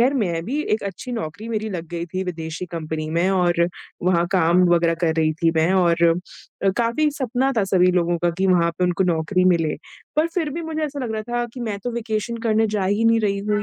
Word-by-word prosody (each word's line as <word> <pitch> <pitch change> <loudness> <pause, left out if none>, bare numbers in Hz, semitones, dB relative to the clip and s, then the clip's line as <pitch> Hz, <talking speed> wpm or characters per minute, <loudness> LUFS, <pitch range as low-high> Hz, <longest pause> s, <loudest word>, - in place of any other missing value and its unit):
खैर 260 +4 +3
मैं 170 -9 -1
भी 270 +9 -2
एक 220 - -4
अच्छी 200 +6 -6
नौकरी 210 +1 -5
मेरी 220 -1 -2
लग 170 -3 -5
गई 170 0 -4
थी 185 +2 -3
विदेशी 165 -1 -5
कंपनी 160 -2 -4
में 170 +3 +1
और 175 -2 +2 0.4
वहाँ 175 -1 +2
काम 180 -1 +4
वगैरह 170 -1 +3
कर 160 -2 +2
रही 155 -1 +2
थी 165 - +5
मैं 160 +3 +3
और 170 -2 +3 0.6
अ, 195 - +4
काफ़ी 235 +6 +2
सपना 260 +1 0
था 205 - +3
सभी 180 -1 +3
लोगों 175 -1 +1
का 175 - +3
कि 190 - +2
वहाँ 175 -2 +3
पे 180 - +2
उनको 180 +1 +1
नौकरी 180 +2 +1
मिले। 170 -4 +2 0.4
पर 310 +2 +4
फिर 325 -5 0
भी 335 +4 -4
मुझे 320 -1 -3
ऐसा 290 -1 -5
लग 225 - -3
रहा 215 0 -3
था 240 0 0
कि 255 - -7
मैं 215 -4 -3
तो 245 - -1
वेकेशन 230 -1 -3
करने 220 0 +3
जा 210 -2 -1
ही 205 +4 +1
नहीं 230 0 +4
रही 200 -2 0
हूँ, 210 +1 -1
190 Hz, 235 wpm, -22 LUFS, 170-225 Hz, 0.6 s, थी